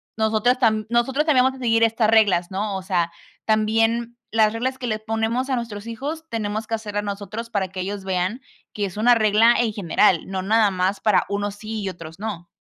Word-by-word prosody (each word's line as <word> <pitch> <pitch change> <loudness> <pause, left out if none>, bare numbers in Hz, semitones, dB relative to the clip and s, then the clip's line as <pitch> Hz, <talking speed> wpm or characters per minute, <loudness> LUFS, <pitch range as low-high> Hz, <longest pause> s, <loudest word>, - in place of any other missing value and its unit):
nosotras 220 +3 +1
tambi 220 -3 +2
nosotros 255 +5 +1
también 265 -5 +4
vamos 265 0 0
a 260 - -12
seguir 230 -1 +3
estas 225 -1 +2
reglas, 205 -5 +3
¿no? 200 +1 -2
O 190 - -5
sea, 175 -3 0 0.3
también 225 +2 +1 0.2
las 220 -1 +3
reglas 260 +3 -2
que 250 -2 -5
les 215 -1 -2
ponemos 225 +4 -1
a 260 - +1
nuestros 230 -2 -5
hijos, 290 +8 -5
tenemos 215 -1 -3
que 225 - -1
hacerlas 210 -2 -4
nosotros 205 +3 -5
para 200 -4 -1
que 185 0 -6
ellos 200 +1 -4
vean 190 +6 -1 0.3
que 205 - -2
es 190 - -7
una 240 +3 +5
regla 220 +1 +4
en 230 -3 +1
general, 185 -2 +2
no 190 -1 -3
nada 210 +1 +3
más 185 +2 0
para 215 -3 +3
unos 200 0 -2
sí 215 0 -6
y 195 - -2
otros 165 -3 -10
no. 200 -5 -5
215 Hz, 210 wpm, -22 LUFS, 200-230 Hz, 0.3 s, una